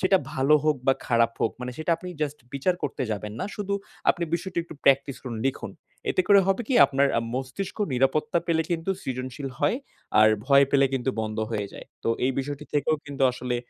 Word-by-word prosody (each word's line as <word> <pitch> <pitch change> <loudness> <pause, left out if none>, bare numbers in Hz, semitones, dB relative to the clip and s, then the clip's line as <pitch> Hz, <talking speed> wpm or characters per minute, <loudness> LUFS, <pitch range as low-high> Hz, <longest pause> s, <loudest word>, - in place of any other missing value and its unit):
সেটা 190 -1 +4 0.2
ভালো 135 +3 +3
হোক 155 -2 +3
বা 135 - +6
খারাপ 115 -1 +3
হোক, - - +2
মানে 125 0 -4
সেটা 160 +2 -2
আপনি 180 +2 -9
just 150 0 -3 0.2
বিচার 140 +7 +1
করতে 140 - -2
যাবেন 105 0 -4
না। - - -1
শুধু 200 -1 -2 0.4
আপনি 175 - -3
বিষয়টি 180 +1 -3
একটু 165 - -11
practice 135 0 +3
করুন, 120 -4 -5
লিখুন। 135 - -3 0.4
এতে - - +2
করে 200 -1 +8
হবে 195 +5 +1
কি 265 - +1
আপনার 140 +1 +2 0.3
মস্তিষ্ক 130 +9 -4 0.2
নিরাপত্তা 135 +6 +2
পেলে 165 -1 +2
কিন্তু 170 +2 -1
সৃজনশীল 130 +2 -4
হয়, - - +2 0.4
আর 110 - +8 0.2
ভয় 140 0 +6
পেলে 140 -1 +5
কিন্তু 130 0 0
বন্ধ 110 0 -4
হয়ে 105 -3 -2
যায়। - - -10 0.2
তো - - +1 0.2
এই 130 - +2
বিষয়টি 145 +2 -4
থেকেও 150 +1 +2
কিন্তু 140 -1 -4
আসলে 125 0 -3
140 Hz, 195 wpm, -26 LUFS, 130-165 Hz, 0.4 s, করে